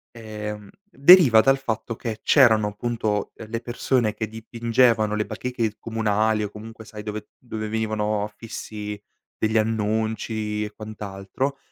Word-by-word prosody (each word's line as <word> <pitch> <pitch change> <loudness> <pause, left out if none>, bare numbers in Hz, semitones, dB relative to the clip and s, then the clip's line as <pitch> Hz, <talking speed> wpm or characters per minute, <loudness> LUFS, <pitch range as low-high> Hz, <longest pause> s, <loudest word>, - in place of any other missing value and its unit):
Ehm, 105 -2 -7 0.2
deriva 140 - +7
dal 135 +2 +4
fatto 115 -3 -3
che 110 -1 -5
c'erano 110 -7 +5
appunto 105 -1 -2
delle 115 +1 -6
persone 120 -2 0
che 110 - -3
dipingevano 115 0 +1
le 105 0 0
bacheche 120 -4 -3
comunali 110 -1 0
o 105 - -3
comunque 110 +1 -10
sai 105 -1 -9
dove 105 0 -6
dove 110 -3 -5
venivano 110 -1 -1
affissi 105 -1 -7 0.4
degli 110 +1 +1
annunci 110 0 -1
e 105 - -5
quant'altro, 110 +5 -5
110 Hz, 130 wpm, -24 LUFS, 105-115 Hz, 0.4 s, deriva